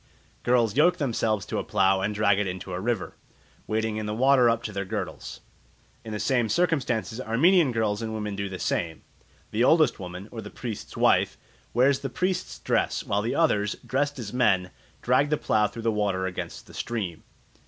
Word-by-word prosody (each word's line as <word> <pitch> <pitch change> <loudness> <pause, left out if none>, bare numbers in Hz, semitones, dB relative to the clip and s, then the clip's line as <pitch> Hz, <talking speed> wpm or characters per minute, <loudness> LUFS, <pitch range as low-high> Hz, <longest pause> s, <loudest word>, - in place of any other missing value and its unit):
Girls 120 -3 +2
yoke 175 +5 +4
themselves 110 - 0
to - - -3
a - - -2
plough 95 0 +2
and 105 +2 -1
drag 105 -1 +3
it 105 - 0
into 90 0 -5
a 90 - -2
river, 110 -1 -2 0.5
wading 110 0 -1
in 110 -1 -3
the 105 - -2
water 130 0 +5
up 115 0 0
to 105 - -4
their 100 -1 -3
girdles. 95 - -5 0.6
In 110 - -7
the 105 - -3
same 120 -3 +1
circumstances 130 - 0
Armenian 150 +7 +4
girls 110 -2 0
and 110 -1 -3
women 105 -2 -3
do 100 0 -3
the 95 - -5
same. 80 -1 -2 0.5
The 110 +3 +1
oldest 155 -3 +4
woman, 90 +1 -7
or 115 - -6
the 105 - -8
priest's 115 -3 -7
wife, - - +3 0.3
wears 130 +3 +3
the 135 - -4
priest's 185 +7 -2
dress, - - 0
while 100 +1 0
the 115 - -2
others, 105 -11 +2
dressed 145 +2 -1
as 115 -4 -6
men, 95 -8 +2 0.3
drag 130 +4 +3
the 150 - +2
plough 105 -5 +2
through 115 +2 -9
the 115 - +2
water 100 -3 0
against 95 -1 -5
the - - -15
stream. 100 -9 -4
110 Hz, 195 wpm, -26 LUFS, 100-125 Hz, 0.6 s, water